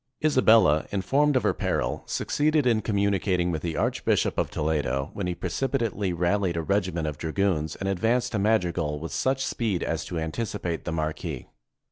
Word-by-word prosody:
Isabella, 110 - +5
informed 135 +10 +2
of 130 - +2
her - - +2
peril, - - -1
succeeded 150 -1 +1
in 115 -3 +3
com 110 0 -2
municating 95 -3 +1
with 80 -2 -3
the 85 -1 -3
Archbishop - - +1
of - - 0
Toledo, 75 -3 -1
when 100 -3 -3
he 90 - -2
precipitately 115 -8 -1
rallied 90 +1 0
a 85 - -1
regiment 90 -3 0
of 75 -1 -4
dragoons 80 -2 0
and 95 - -4
ad 95 -2 -1
vanced 120 +4 +1
to 110 - -1
Madrigal 90 -8 +1
with 80 +2 -6
such 135 0 0
speed 105 -7 -1
as 80 -1 -2
to 85 - -5
anticipate 80 0 -3
the 90 - -2
marquis. 80 -1 -3
95 Hz, 175 wpm, -26 LUFS, 80-110 Hz, -, Isabella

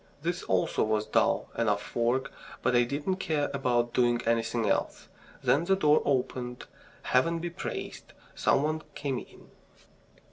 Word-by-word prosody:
This 175 +2 -1
also 95 -1 +1
was 110 0 0
dull - - +1
enough 105 -3 -1
work, 120 +3 +1 0.3
but 125 - +2
I 120 0 +5
didn't 145 +9 -2
care 155 -6 -1
about 120 -3 +1
doing 120 -1 +3
anything 115 -1 +1
else. - - -1 0.3
Then 155 +5 +3
the 195 +2 +3
door 150 -5 +4
opened. 125 -2 -1 0.4
Heaven 165 +7 +2
be 170 +1 -4
praised! - - -6 0.2
Some 140 - +2
one 155 +1 -1
came 135 -3 -2
in. - - -15
125 Hz, 145 wpm, -29 LUFS, 120-155 Hz, 0.4 s, I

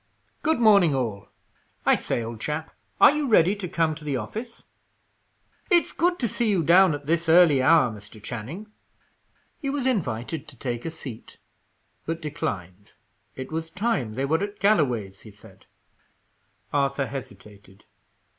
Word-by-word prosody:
"Good 320 -4 +1
morning 200 -10 +5
all! 110 -6 -3 0.6
I - - +5
say, 120 - -1
old 115 -1 -7
chap, 155 +1 -4 0.3
are - - +8
you 295 -1 -1
ready 200 -4 +4
to 195 -3 -4
come 165 -2 0
to 155 0 -11
the 145 -3 -2
office? 220 - -7 1.1
It's 345 -1 +3
good 350 +1 +1
to 240 - -1
see 230 +2 -1
you 190 -5 +2
down 175 +1 +5
at 145 0 -9
this 165 +2 0
early 160 -5 +6
hour, 135 -2 +5
Mr. 105 +1 -12
Channing." 145 - -7 0.9
He 275 - -3
was 275 -2 -2
invited 155 - -2
to 145 -4 -12
take 120 -1 -4
a - - -1
seat, 135 -8 -9 0.7
but 165 0 -2
declined; 100 - -5 0.4
it 130 +2 -7
was 160 0 -4
time 165 - -1
they 135 +2 -1
were 160 +5 +1
at 205 0 -5
Galloway's, 125 - +1
he 110 - -13
said. 100 -1 -17 1.1
Arthur 140 -1 +1
hesitated. 105 -7 -10
150 Hz, 155 wpm, -25 LUFS, 120-195 Hz, 1.1 s, are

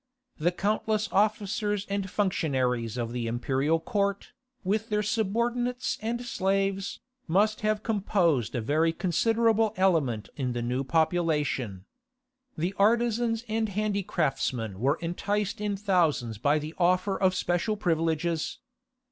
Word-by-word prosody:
The 170 +3 +2
countless 215 +3 0
officers 205 0 +1
and 200 -1 -2
functionaries 130 - 0
of 115 -1 -2
the 120 -1 -3
imperial 135 +7 +1
court, 200 +3 -1 0.3
with 215 +4 -1
their 210 0 +1
subordinates 235 +4 -1
and 235 +2 -3
slaves, 195 -2 -1 0.3
must 205 +6 +2
have 215 0 0
composed 180 - +1
a 120 - 0
very 155 +7 +2
considerable 220 +5 +2
element 155 - +1
in 130 -4 -2
the 120 -1 -2
new 125 +3 -1
population. 150 - 0 0.7
The 175 +5 -1
artizans 230 +2 +2
and 220 0 0
handicraftsmen 170 - -1
were 140 +6 +2
enticed 200 +4 -2
in 205 -1 -1
thousands 165 - +1
by 145 +5 +3
the 155 +1 -5
offer 185 +2 +2
of 185 -1 +2
special 180 +4 0
privileges. 165 -2 0
190 Hz, 120 wpm, -28 LUFS, 150-210 Hz, 0.7 s, by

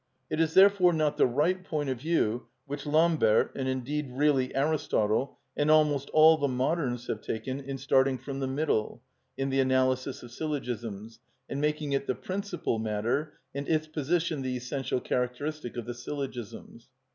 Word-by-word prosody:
It - - -1
is 160 -1 0
therefore 190 -2 +6
not 155 -2 +1
the - - +5
right 160 +9 +1
point 150 -5 -2
of 130 -2 -2
view 130 -7 0 0.2
which 145 +1 -6
Lambert, 155 -8 +3
and 135 -1 -2
indeed 130 +2 -2
really 135 0 +2
Aristotle, 135 -5 +1 0.2
and 145 +1 +1
almost 150 -3 +3
all 155 +1 +7
the 145 -2 +1
moderns 130 -1 -1
have 110 - -3
taken 130 +4 -4
in 135 0 -5
starting 135 0 +2
from 135 +2 -6
the 135 - -1
middle 135 -5 -1 0.3
in 135 0 -1
the 135 - +1
analysis 130 0 +1
of 120 - -11
syllogisms, 120 -7 -4 0.3
and 140 - -3
making 150 -1 -1
it 140 0 -1
the 130 - 0
principal 190 - -3
matter 110 +8 -1 0.2
and 140 +1 -4
its 155 -1 +2
position 155 0 -1
the 130 -1 -2
essential 125 +1 -2
characteristic 125 +2 -3
of 120 - -4
the 120 - -4
syllogisms. 125 -2 -7
135 Hz, 165 wpm, -29 LUFS, 125-155 Hz, 0.3 s, all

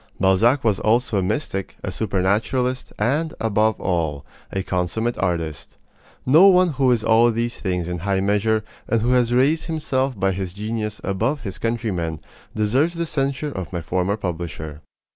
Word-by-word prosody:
Balzac 110 +8 +3
was 110 -4 +2
also 115 -1 +2
a - - +1
mystic, 95 -1 -2
a - - -3
supernaturalist, 110 +6 0
and, 150 +9 0
above 110 0 +1
all, 80 -6 -1 0.3
a 95 - -2
consummate 95 +7 -1
artist. 85 -5 -3 0.5
No 160 +9 +7
one 185 -2 +5
who 135 -4 +2
is 115 -3 +1
all 115 +1 +5
these 120 +1 -2
things 90 -3 -2
in 90 0 -3
high 95 +2 0
measure, 105 +2 +1 0.2
and 115 - +1
who 120 - +2
has 125 -2 +3
raised 140 +6 +2
himself 135 - -1
by 95 0 +2
his 95 -1 -4
genius 105 +1 -4
above 115 +9 -1
his 100 -5 -6
countrymen, 100 -9 -2 0.4
deserves 130 +11 +1
the 170 0 -1
censure 140 -1 -2
of 95 - -6
my 85 -3 -4
former 95 +5 0
publisher. 80 -5 -5
110 Hz, 160 wpm, -22 LUFS, 95-125 Hz, 0.5 s, No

